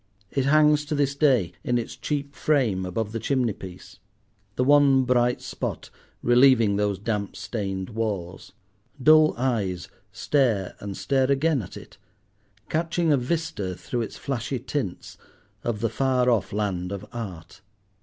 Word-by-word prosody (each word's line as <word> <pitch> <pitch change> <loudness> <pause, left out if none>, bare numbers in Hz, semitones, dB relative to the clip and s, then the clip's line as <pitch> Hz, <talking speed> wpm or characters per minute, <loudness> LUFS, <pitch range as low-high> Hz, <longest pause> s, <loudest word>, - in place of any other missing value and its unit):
It 135 -2 0
hangs 150 +1 +4
to 150 0 -2
this 140 -1 +1
day 130 - +2
in 120 - +1
its 120 - -4
cheap 140 -1 -3
frame 120 -13 +1
above 105 +4 -3
the 115 - -3
chimney 125 -1 0
piece, 95 -2 -11 0.6
the 125 - +1
one 140 -1 +5
bright 125 -1 +1
spot - - -5 0.3
relieving 120 -4 +5
those 100 -1 0
damp 105 -1 -3
stained 95 -3 -4
walls; 100 -6 -4 0.5
dull 155 +3 +6
eyes 110 -8 -1 0.2
stare 115 -10 0
and 100 -1 -6
stare 135 -1 +1
again 140 0 +2
at 95 - -9
it, - - -13 0.7
catching 165 0 0
a 145 - +5
vista, 125 - -2
through 120 +7 -4
its 115 - -5
flashy 130 -1 -3
tints, 120 -5 -5 0.4
of 110 -3 -2
the 115 - +2
far 125 +1 +2
off 110 -6 0
land 95 -3 -2
of 100 0 -5
art. 95 -7 -8
120 Hz, 145 wpm, -25 LUFS, 100-140 Hz, 0.7 s, dull